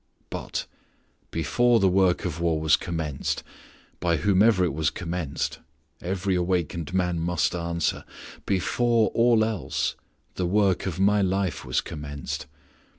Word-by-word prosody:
But - - -4 0.6
before 115 +10 +2
the 95 - +4
work 95 -1 +3
of 85 -3 -3
war 85 -2 +1
was 80 -1 +4
commenced, 80 -5 -3 0.6
by 85 -2 +1
whomsoever 100 +3 +4
it 85 - -1
was 80 +1 +1
commenced 85 -5 -3 0.4
every 95 +2 -1
awakened 90 -3 -1
man 90 -2 0
must 85 -2 0
answer 85 -2 -1 0.4
before 115 +3 +2
all 115 -2 +4
else 75 -8 -2 0.4
the 90 - 0
work 95 -1 +2
of 90 -1 -3
my 100 +1 +4
life 95 -2 0
was - - 0
commenced. 75 0 -6
90 Hz, 130 wpm, -26 LUFS, 80-95 Hz, 0.6 s, the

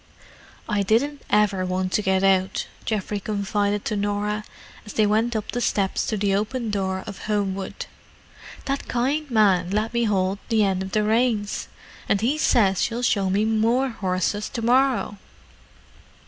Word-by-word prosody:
"I 210 -2 0
didn't 260 +8 +1
ever 205 -3 +2
want 185 0 -1
to 210 - +1
get 190 -1 +1
out," 190 -1 +2 0.2
Geoffrey 210 -1 -2
confided 205 0 -1
to 215 - -1
Norah, 205 +1 -1 0.4
as 210 - -10
they 215 - +3
went 220 +3 +1
up 215 - -3
the 245 - -2
steps 195 -4 0
to 215 - -1
the 200 -1 +1
open 220 +3 -1
door 190 -2 -2
of 200 - -8
Homewood. 195 -2 -2 0.8
"That 275 0 -2
kind 275 +5 -1
man 195 -6 +3
let 215 +4 -1
me 235 0 +1
hold 195 -2 0
the 220 -2 +3
end 190 -2 +1
of 190 0 -6
the 215 - +2
reins. 220 -1 0 0.4
And 200 - +3
he 260 +8 0
says 195 - +3
he'll 240 +1 -4
show 200 -5 +2
me 200 +3 +2
more 225 +4 +2
horses 200 -1 -2
to 230 - -5
morrow." 250 -4 +2
210 Hz, 160 wpm, -23 LUFS, 195-230 Hz, 0.8 s, they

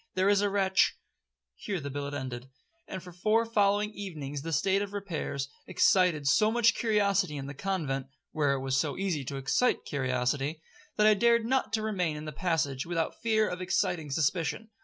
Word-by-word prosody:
There 185 +1 +3
is 205 -1 +4
a 205 - +2
wretch—' 195 -1 +2 0.6
'Here 200 -5 -4
the 140 -1 -6
billet 145 +1 -4
ended; 130 -2 -6 0.4
and 185 -2 -6
for 180 - -10
four 215 +6 +1
following 210 -2 +2
evenings 155 -9 -6
the 165 +3 -5
state 190 +6 +2
of 205 - -3
the 205 - -10
repairs 160 -8 -3 0.2
excited 180 -4 +3
so 215 +11 +4
much 230 -1 +4
curiosity 200 -9 +1
in 135 - -5
the 140 - -6
convent, 140 -6 -2 0.2
(where 145 -3 +1
it 135 0 -4
is 130 - +1
so 140 +1 0
easy 185 -7 -1
to 140 - -5
excite 135 - +1
curiosity), 135 +2 -1 0.4
that 210 - +3
I 215 - +7
dared 235 +2 +3
not 260 +2 0
to 220 -1 0
remain 180 -8 -1
in 150 - -7
the 155 - -5
passage, 150 -5 -1
without 165 -2 -1
the - - -25
fear 220 -2 +2
of 180 +1 -4
exciting 175 -3 0
suspicion. 160 +8 -1
175 Hz, 195 wpm, -29 LUFS, 140-205 Hz, 0.6 s, I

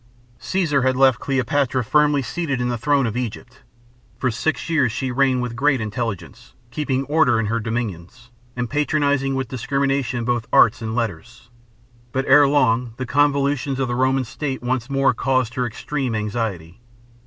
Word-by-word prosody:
Caesar 165 -7 0
had 130 0 +1
left 130 -2 +4
Cleopatra 135 -1 0
firmly 150 +3 +2
seated 140 -2 -3
on 125 0 -1
the 120 - -1
throne 140 +2 +2
of 115 -1 -3
Egypt. 125 0 -6 0.6
For 125 0 0
six 160 +7 -2
years 150 -8 +2
she 130 +2 -3
reigned 130 -1 +2
with 120 -1 -4
great 140 +1 +2
intelligence, 115 +1 -5 0.2
keeping 135 -2 -1
order 150 -4 +2
in 115 - 0
her 115 +3 -1
dominions, 115 +1 -5 0.2
and 125 -1 -2
patronizing 145 -1 0
with 135 0 -2
discrimination 135 -1 -1
both 120 -2 -1
arts 110 +2 +5
and 110 0 -4
letters. 115 +2 -5 0.6
But 135 +1 -1
ere 140 +1 +6
long 125 -4 +1
the 130 - -3
convulsions 140 -1 +1
of 135 - 0
the 120 - -2
Roman 130 +1 +2
state 135 +1 -5
once 120 -1 -2
more 135 -1 +2
caused 130 -1 0
her 125 -1 -1
extreme 125 +2 -3
anxiety. 105 -4 -4
130 Hz, 165 wpm, -21 LUFS, 115-140 Hz, 0.6 s, ere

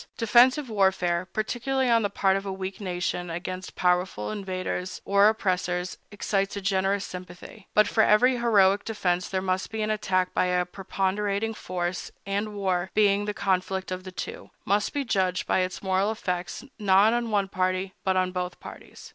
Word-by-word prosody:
Defensive 250 +5 +4
warfare, 185 -4 +1
particularly 255 +4 -1
on 230 -1 +4
the 205 - 0
part 195 -1 +2
of 195 - -2
a 195 - -4
weak 190 +1 -5
nation 180 -1 -2
against 185 +2 -6
powerful 180 - 0
invaders 185 -2 -4
or 200 +1 +5
oppressors, 180 -4 -1
excites 200 -1 -1
a - - -2
generous 195 0 0
sympathy; 180 +1 -10
but 215 -1 +5
for 220 - +2
every 245 +5 +4
heroic 205 -4 +4
defense 180 -5 -1
there 190 -1 -1
must 185 0 -1
be 220 -1 -3
an 215 - 0
attack 185 -4 0
by - - +2
a 180 0 +1
preponderating 200 +3 -2
force, 180 -3 -4 0.2
and 205 +2 -2
war, 185 -2 -1
being 205 -1 +3
the 210 - -2
conflict 190 -1 -1
of 185 0 -4
the 185 - -8
two, - - -7 0.2
must 205 +2 +1
be 285 -1 -2
judged 185 -5 0
by - - +2
its 185 +1 -2
moral 190 +2 +1
effects 180 +1 -4
not 205 +2 +5
on 240 -1 -1
one 200 -2 +1
party, 185 0 -1
but 190 -1 +1
on 185 0 +1
both 180 -1 -4
parties. - - -11
195 Hz, 175 wpm, -26 LUFS, 185-210 Hz, 0.2 s, or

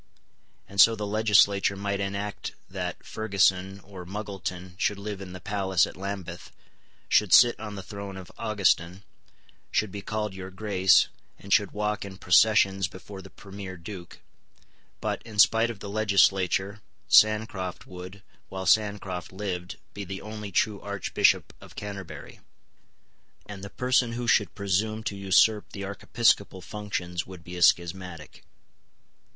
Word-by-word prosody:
And 100 0 +3
so 115 +3 +7
the 105 -1 -4
legislature 100 -2 +3
might 100 0 -2
enact 100 +1 -4
that 90 -2 -5
Ferguson 95 -2 +1
or 95 -2 -10
Muggleton 95 -2 -6
should 105 - +1
live 100 -1 -6
in 95 -2 -8
the 95 - -8
palace 95 -3 +1
at - - -10
Lambeth, 95 -8 -6 0.6
should 105 -4 +3
sit 120 -1 +7
on 105 -2 -6
the 100 - -7
throne 100 0 -7
of 95 -2 -10
Augustin, 95 -3 0 0.7
should 110 -3 0
be 100 - -6
called 105 -1 -3
Your 95 0 -7
Grace, 95 -1 +3 0.3
and 100 - -3
should 105 -3 +4
walk 105 0 -2
in 95 -1 -9
processions 95 0 +4
before 95 +2 -10
the 95 - -13
Premier 95 -1 -9
Duke; 85 0 -10 0.8
but, - - -2
in 110 -3 -11
spite 115 +2 +5
of 110 -4 -7
the - - -6
legislature, 100 -1 +2 0.3
Sancroft 105 -4 +3
would, 90 +1 -10 0.3
while 95 0 -5
Sancroft 100 -3 +1
lived, 95 -2 -5 0.2
be 100 - -6
the 95 +1 -7
only 105 -1 -7
true 105 +2 +1
Archbishop 100 -1 +1
of - - -14
Canterbury; 100 -3 -8 1.1
and 100 -2 -9
the 100 - -6
person 125 0 +1
who 120 0 -4
should 105 -6 +2
presume 105 +3 -1
to 105 - -3
usurp 100 +2 +3
the 100 - -6
archiepiscopal 100 -1 +1
functions 90 -5 -4
would 90 -2 -11
be 90 0 -9
a 90 - -6
schismatic. 85 -3 +1
100 Hz, 145 wpm, -27 LUFS, 95-105 Hz, 1.1 s, so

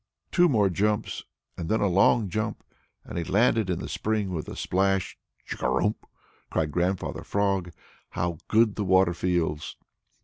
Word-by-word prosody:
Two 175 -1 +5
more 105 -7 +3
jumps 105 +4 -1 0.3
and 85 -2 -5
then 110 - +2
a - - +2
long 100 +4 +4
jump, 105 +4 -3 0.4
and - - -5
he - - -1
had - - -9
landed 110 0 +3
in 90 - 0
the - - -5
spring 105 -3 -1
with 80 -4 -4
a - - -7
splash! 95 0 0 0.3
"Chugarum!" 105 - 0 0.6
cried 75 -2 0
Grandfather 90 +3 -1
Frog. 100 -3 0 0.4
"How 85 -1 -2
good 110 -1 +3
the 105 - 0
water 95 -2 +4
feels!" 80 -5 -1
95 Hz, 160 wpm, -26 LUFS, 85-105 Hz, 0.6 s, Two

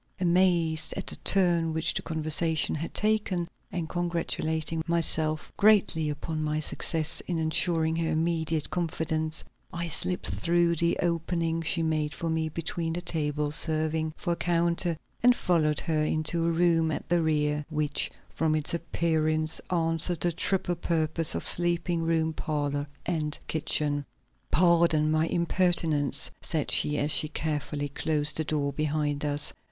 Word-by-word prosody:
Amazed 170 -3 +2
at 195 - -4
the - - 0
turn 170 -4 +2
which 160 +1 0
the - - -1
conversation 160 0 0
had 160 +2 -4
taken 210 -5 0 0.2
and 170 -3 -3
congratulating 165 -2 -2
myself 160 -2 +1
greatly 200 -7 +3
upon 155 +2 -4
my 155 0 -1
success 155 +1 +3
in 175 - -1
insuring 160 0 +2
her 165 -1 -1
immediate 160 -1 -1
confidence, 160 -2 -2 0.3
I 170 0 -4
slipped 180 +3 +3
through 170 0 +1
the 170 +2 +2
opening 165 -1 -1
she 165 +1 0
made 155 -2 -1
for 165 -1 -3
me 160 -1 -1
between 165 +1 -3
the 175 - -3
tables 150 -3 0
serving 155 0 0
for 175 - -2
a - - -2
counter 170 0 0 0.2
and 245 +1 +5
followed 155 -7 +1
her 155 -2 0
into 155 +2 0
a - - +2
room 165 -1 +2
at 155 - -4
the 175 0 +2
rear, 150 -1 0
which 150 -2 -1 0.2
from 160 -1 -1
its 155 +1 -2
appearance 160 -1 -1
answered 165 -1 +1
the 175 - +2
triple 180 +1 -1
purpose 160 -1 +1
of - - -3
sleeping 175 0 +2
room, 165 -1 0
parlor 145 -2 -2 0.2
and 155 -3 -1
kitchen. 150 -2 0 0.4
"Pardon 170 -3 +3
my 155 +1 +1
impertinence," 170 -4 +1
said 155 -3 -2
she, 150 0 +1
as 145 +1 0
she 155 - +3
carefully 150 -1 -3
closed 150 +1 -1
the 160 - +1
door 145 -2 -2
behind 150 0 -1
us. 145 0 +1
160 Hz, 145 wpm, -27 LUFS, 155-170 Hz, 0.4 s, and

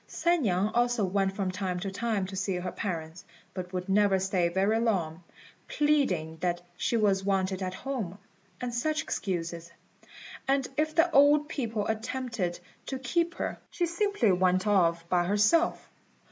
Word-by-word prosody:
San 345 -1 +1
niang 195 -3 +1
also 240 -3 +2
went 195 +1 +1
from 195 -2 -1
time 185 -1 -3
to 195 0 -3
time 215 -1 -1
to 190 +1 -7
see 190 0 -1
her 180 0 -3
parents, 165 -4 -5 0.3
but 180 -1 -6
would 180 -1 -4
never 200 0 +3
stay 185 -2 +1
very 195 +5 +2
long, 180 -8 0 0.5
pleading 200 - +1
that 175 +1 -1 0.2
she 235 - 0
was 200 -3 +2
wanted 190 -1 0
at 185 -1 -3
home, 235 -9 -4 0.4
and 245 -1 -4
such 310 +6 0
excuses; 170 -3 -3 0.8
and 270 -1 +2
if 310 +2 0
the 335 +1 +4
old 290 +1 +5
people 230 -8 -2
attempted 220 -5 -2 0.3
to 265 - -3
keep 335 +7 0
her, - - -3
she 350 - -1
simply 340 - +1
went 185 +1 +2
off 170 -5 +2
by 175 0 +2
herself. 210 - +2
200 Hz, 160 wpm, -29 LUFS, 185-250 Hz, 0.8 s, old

